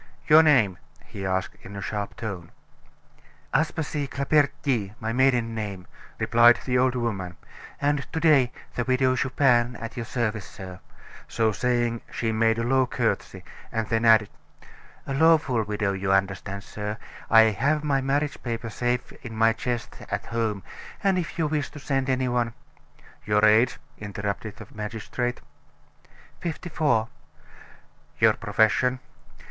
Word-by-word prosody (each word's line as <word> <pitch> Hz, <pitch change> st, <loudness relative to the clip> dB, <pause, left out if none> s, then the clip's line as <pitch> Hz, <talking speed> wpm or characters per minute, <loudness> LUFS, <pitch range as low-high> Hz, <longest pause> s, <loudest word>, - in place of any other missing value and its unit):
"Your 155 Hz, +1 st, +8 dB
name?" 120 Hz, -, +3 dB, 0.3 s
he 95 Hz, -1 st, -6 dB
asked 95 Hz, 0 st, -2 dB
in 100 Hz, -, -10 dB
a 100 Hz, -, -5 dB
sharp 105 Hz, -2 st, -4 dB
tone. 100 Hz, -8 st, -6 dB, 1.0 s
"Aspasie 155 Hz, -2 st, -1 dB
Claperdty, 140 Hz, -7 st, 0 dB
my 110 Hz, +1 st, -3 dB
maiden 125 Hz, -3 st, +2 dB
name," 100 Hz, -5 st, -5 dB, 0.3 s
replied 120 Hz, +1 st, +5 dB
the 125 Hz, -, 0 dB
old 130 Hz, 0 st, +3 dB
woman, 100 Hz, -7 st, -3 dB, 0.4 s
"and 145 Hz, 0 st, 0 dB
to 160 Hz, -, -2 dB
day, 145 Hz, -6 st, +4 dB, 0.2 s
the 120 Hz, -, -1 dB
Widow 130 Hz, +1 st, +2 dB
Chupin, 125 Hz, -2 st, +2 dB
at 115 Hz, -1 st, -7 dB
your 115 Hz, -2 st, -5 dB
service, 110 Hz, -5 st, -2 dB
sir;" 95 Hz, -1 st, -9 dB, 0.5 s
so 110 Hz, -1 st, +1 dB
saying, 120 Hz, 0 st, 0 dB
she 115 Hz, -1 st, -1 dB
made 110 Hz, 0 st, +2 dB
a 115 Hz, -, -1 dB
low 130 Hz, +1 st, +2 dB
courtesy, -, -, -2 dB, 0.3 s
and 110 Hz, -1 st, -2 dB
then 115 Hz, 0 st, +1 dB
added: 110 Hz, -3 st, +5 dB, 0.8 s
"A 135 Hz, -, -3 dB
lawful 155 Hz, -5 st, +4 dB
widow, 105 Hz, -1 st, -1 dB
you 95 Hz, 0 st, -1 dB
understand, 95 Hz, 0 st, 0 dB
sir; 105 Hz, 0 st, -5 dB, 0.3 s
I 115 Hz, 0 st, +8 dB
have 145 Hz, +9 st, 0 dB
my 140 Hz, -2 st, +1 dB
marriage 140 Hz, +2 st, -1 dB
papers 115 Hz, -2 st, -4 dB
safe 125 Hz, +2 st, -1 dB
in 115 Hz, -2 st, -7 dB
my 115 Hz, 0 st, +4 dB
chest 120 Hz, -1 st, -4 dB
at -, -, -3 dB
home; 110 Hz, -4 st, -2 dB, 0.4 s
and 195 Hz, -2 st, +3 dB
if 170 Hz, -, -5 dB
you 165 Hz, -, +1 dB
wish 150 Hz, -2 st, -1 dB
to 150 Hz, -, -11 dB
send 135 Hz, -1 st, -1 dB
any 130 Hz, 0 st, +1 dB
one 120 Hz, -2 st, -1 dB, 0.3 s
" -, -, -26 dB
"Your 105 Hz, 0 st, +4 dB
age?" 110 Hz, +4 st, +4 dB, 0.2 s
interrupted 100 Hz, +1 st, -4 dB
the -, -, -10 dB
magistrate. 110 Hz, +3 st, -4 dB, 1.0 s
"Fifty 175 Hz, +1 st, -5 dB
four." 125 Hz, -8 st, +1 dB, 1.1 s
"Your -, -, +5 dB
profession?" 125 Hz, +4 st, +1 dB
120 Hz, 145 wpm, -25 LUFS, 105-135 Hz, 1.1 s, Your